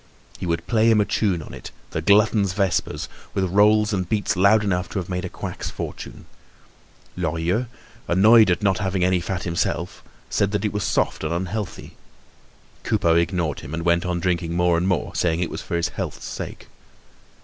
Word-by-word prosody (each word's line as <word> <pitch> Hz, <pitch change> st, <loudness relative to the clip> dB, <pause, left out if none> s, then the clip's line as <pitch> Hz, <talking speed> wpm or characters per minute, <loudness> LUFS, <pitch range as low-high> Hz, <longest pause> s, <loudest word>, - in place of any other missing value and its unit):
He 90 Hz, -, -4 dB
would 85 Hz, -1 st, -1 dB
play 115 Hz, -1 st, +3 dB
him 110 Hz, -2 st, +5 dB
a 105 Hz, -, +3 dB
tune 95 Hz, -8 st, 0 dB
on -, -, -11 dB
it, -, -, -8 dB, 0.2 s
the 80 Hz, -, -2 dB
glutton's 100 Hz, +1 st, +3 dB
vespers, 95 Hz, -3 st, -1 dB, 0.3 s
with 95 Hz, -, +1 dB
rolls 105 Hz, +3 st, +3 dB
and 95 Hz, -3 st, -2 dB
beats 105 Hz, -2 st, 0 dB
loud 100 Hz, +4 st, +4 dB
enough 90 Hz, -3 st, -1 dB
to -, -, -5 dB
have 90 Hz, -1 st, -3 dB
made 90 Hz, -1 st, -2 dB
a -, -, -4 dB
quack's -, -, -6 dB
fortune. -, -, -7 dB, 0.9 s
Lorilleux, 85 Hz, +7 st, -1 dB, 0.4 s
annoyed 110 Hz, +4 st, +6 dB
at 90 Hz, +4 st, +1 dB
not 95 Hz, -2 st, +2 dB
having 95 Hz, -2 st, 0 dB
any 90 Hz, 0 st, +3 dB
fat 90 Hz, +1 st, -3 dB
himself, 85 Hz, -1 st, -2 dB, 0.3 s
said 100 Hz, -, +1 dB
that 105 Hz, +1 st, 0 dB
it 105 Hz, -, -1 dB
was 105 Hz, -2 st, -1 dB
soft -, -, 0 dB
and 75 Hz, -, -2 dB
unhealthy. 95 Hz, +4 st, -4 dB, 0.8 s
Coupeau 85 Hz, -, +2 dB
ignored 85 Hz, -3 st, 0 dB
him 70 Hz, +5 st, -6 dB
and 85 Hz, 0 st, -4 dB
went 85 Hz, 0 st, +3 dB
on 90 Hz, -1 st, -1 dB
drinking 85 Hz, -1 st, -1 dB
more 90 Hz, 0 st, +3 dB
and 85 Hz, +2 st, 0 dB
more, 90 Hz, -3 st, -1 dB
saying 85 Hz, -1 st, 0 dB
it 90 Hz, -, -2 dB
was -, -, -5 dB
for -, -, -4 dB
his 85 Hz, -, 0 dB
health's -, -, -5 dB
sake. -, -, -7 dB
90 Hz, 190 wpm, -23 LUFS, 85-105 Hz, 0.9 s, annoyed